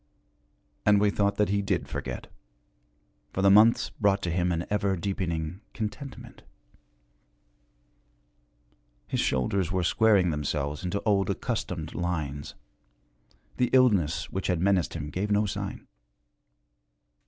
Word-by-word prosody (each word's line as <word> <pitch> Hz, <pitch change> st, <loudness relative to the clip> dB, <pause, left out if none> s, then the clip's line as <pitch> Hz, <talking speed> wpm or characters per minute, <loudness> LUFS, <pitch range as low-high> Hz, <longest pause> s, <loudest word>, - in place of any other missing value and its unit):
And 105 Hz, -1 st, +5 dB
we 105 Hz, 0 st, +3 dB
thought 100 Hz, 0 st, +1 dB
that 105 Hz, -2 st, +1 dB
he 100 Hz, 0 st, +1 dB
did 95 Hz, -3 st, -1 dB
forget, -, -, -5 dB, 1.1 s
for 95 Hz, -, -1 dB
the 100 Hz, -, +6 dB
months 110 Hz, +3 st, +5 dB
brought 100 Hz, -1 st, +1 dB
to 85 Hz, -, -1 dB
him 90 Hz, +1 st, +1 dB
an 85 Hz, 0 st, -1 dB
ever 100 Hz, -2 st, +1 dB
deepening 85 Hz, -1 st, -3 dB
contentment. 115 Hz, +5 st, -6 dB, 2.6 s
His -, -, -2 dB
shoulders 85 Hz, +8 st, 0 dB
were 90 Hz, -1 st, 0 dB
squaring 100 Hz, -2 st, +3 dB
themselves 75 Hz, 0 st, -2 dB
into 95 Hz, +3 st, -2 dB
old 100 Hz, -3 st, +2 dB
accustomed -, -, -3 dB
lines, 75 Hz, -5 st, -3 dB, 1.0 s
the 125 Hz, -, +2 dB
illness 90 Hz, -, +3 dB
which 95 Hz, -, -3 dB
had 90 Hz, -3 st, +1 dB
menaced 90 Hz, -3 st, +1 dB
gave 100 Hz, +3 st, -2 dB
no 105 Hz, +1 st, +2 dB
sign. 100 Hz, -, -5 dB
95 Hz, 120 wpm, -27 LUFS, 85-105 Hz, 2.6 s, the